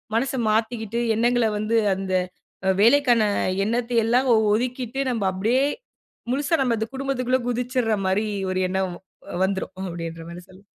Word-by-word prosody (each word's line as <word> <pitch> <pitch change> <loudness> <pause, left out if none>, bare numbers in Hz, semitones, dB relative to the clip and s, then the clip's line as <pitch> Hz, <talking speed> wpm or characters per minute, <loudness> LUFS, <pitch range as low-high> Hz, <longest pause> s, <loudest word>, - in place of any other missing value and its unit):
மனச 265 +3 0 0.2
மாத்திக்கிட்டு 225 0 -1 0.2
எண்ணங்கள 240 0 +2
வந்து 220 +2 +1 0.2
அந்த 190 0 -4 0.7
வேலைக்கான 240 0 +5 0.4
எண்ணத்த 235 +2 -1
எல்லாம் 250 +3 +2 0.3
ஒதுக்கிட்டு 250 +2 -2
நம்ம 225 -4 -2
அப்பிடியே 225 +8 +1 0.7
முழுசா 285 +4 +1
நம்ம 240 -3 +1
அந்த 220 +1 -2
குடும்பத்துக்குள்ளே 260 -1 0
குதிச்சிர்றமாரி 225 -5 0 0.2
ஒரு 185 - -1
எண்ணம் 190 -1 -1 0.5
வந்துரும் 190 0 -2 0.2
அப்பிடின்றமாரி 170 +1 -7
சொல்லலாம். 190 +2 -17
230 Hz, 115 wpm, -23 LUFS, 195-250 Hz, 0.7 s, வேலைக்கான